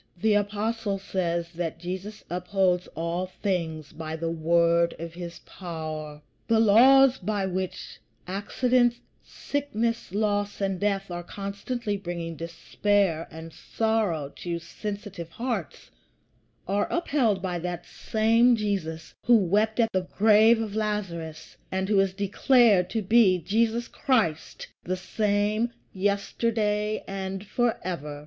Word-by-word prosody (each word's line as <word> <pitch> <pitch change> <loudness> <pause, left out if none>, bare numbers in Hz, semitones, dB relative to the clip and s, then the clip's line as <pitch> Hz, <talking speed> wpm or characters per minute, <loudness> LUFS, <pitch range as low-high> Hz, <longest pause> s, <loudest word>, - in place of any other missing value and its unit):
The 220 +3 +3
Apostle 205 +1 0
says 170 -3 -2
that 165 -2 -4
Jesus 185 +5 -6
upholds 180 0 0
all 170 +3 -2
things 165 -6 -3
by 160 0 -5
the 165 0 -2
word 170 +1 +2
of 165 0 -7
his 175 0 -8
power. 155 -4 -6 0.2
The 225 -1 +3
laws 255 +5 +6
by 205 0 -1
which 185 0 -4 0.3
accident, 240 +6 +1 0.3
sickness, 235 -8 -3
loss, 205 0 0
and 195 -2 -1
death 200 -2 -1
are 175 0 -4
constantly 200 +4 -4
bringing 170 -3 -5
despair 170 +1 0
and 160 0 -10
sorrow 215 -10 -1
to 170 -1 -3
sensitive 200 0 -6
hearts 220 - -4 0.8
are 200 +2 0
upheld 270 - +1
by 180 -2 -2
that 175 0 -4
same 230 +3 +3
Jesus 185 -7 -3
who 240 - +7
wept 210 +4 +1
at 225 -1 +4
the 185 -1 0
grave 220 +2 +6
of 215 -2 -3
Lazarus, 190 -7 -3
and 190 0 -1
who 205 -2 +4
is 195 -1 +3
declared 205 -1 +4
to 225 -2 -2
be 200 -2 +5
Jesus 225 +7 0
Christ, 220 - 0 0.2
the 185 +1 -2
same 210 +4 0 0.2
yesterday 210 +2 0
and 195 0 -4
forever. 180 - -2
195 Hz, 125 wpm, -26 LUFS, 170-220 Hz, 0.8 s, who